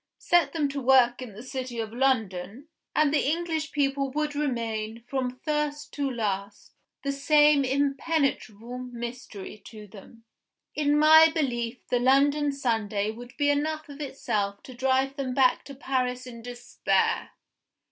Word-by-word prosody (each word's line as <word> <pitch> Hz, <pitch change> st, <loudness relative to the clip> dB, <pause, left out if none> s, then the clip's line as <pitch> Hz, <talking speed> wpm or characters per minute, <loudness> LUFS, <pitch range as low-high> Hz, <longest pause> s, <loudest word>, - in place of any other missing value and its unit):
Set 340 Hz, -5 st, +2 dB
them 300 Hz, -2 st, 0 dB
to 280 Hz, 0 st, -4 dB
work 250 Hz, -1 st, +4 dB
in 245 Hz, -5 st, -8 dB
the 215 Hz, +4 st, -10 dB
city 260 Hz, -2 st, -5 dB
of 220 Hz, -1 st, -4 dB
London 230 Hz, -, -1 dB, 0.3 s
and 300 Hz, -1 st, +3 dB
the 300 Hz, -, +3 dB
English 320 Hz, -1 st, -2 dB
people 275 Hz, -1 st, 0 dB
would 300 Hz, +2 st, -2 dB
remain, 230 Hz, -6 st, -3 dB
from 255 Hz, -2 st, -3 dB
first 300 Hz, -1 st, -2 dB
to 280 Hz, -1 st, -1 dB
last, 205 Hz, -4 st, -4 dB, 0.3 s
the 280 Hz, -, 0 dB
same 295 Hz, +1 st, +4 dB
impenetrable 275 Hz, -4 st, -1 dB
mystery 240 Hz, -5 st, -7 dB
to 215 Hz, -1 st, -11 dB
them. 215 Hz, +3 st, -15 dB, 0.5 s
In 295 Hz, -1 st, +2 dB
my 315 Hz, +1 st, +8 dB
belief 250 Hz, -6 st, -2 dB
the 245 Hz, -, +2 dB
London 285 Hz, +3 st, +3 dB
Sunday 220 Hz, -6 st, -1 dB
would 245 Hz, +2 st, -12 dB
be 290 Hz, -1 st, +3 dB
enough 310 Hz, +1 st, -2 dB
of 285 Hz, +1 st, -9 dB
itself 205 Hz, -8 st, -3 dB
to 260 Hz, -, -10 dB
drive 265 Hz, +2 st, 0 dB
them 260 Hz, -2 st, -3 dB
back 260 Hz, -2 st, +3 dB
to 280 Hz, -, -9 dB
Paris 255 Hz, -2 st, -2 dB
in 235 Hz, -2 st, -9 dB
despair. 245 Hz, 0 st, -1 dB
260 Hz, 145 wpm, -27 LUFS, 235-290 Hz, 0.5 s, my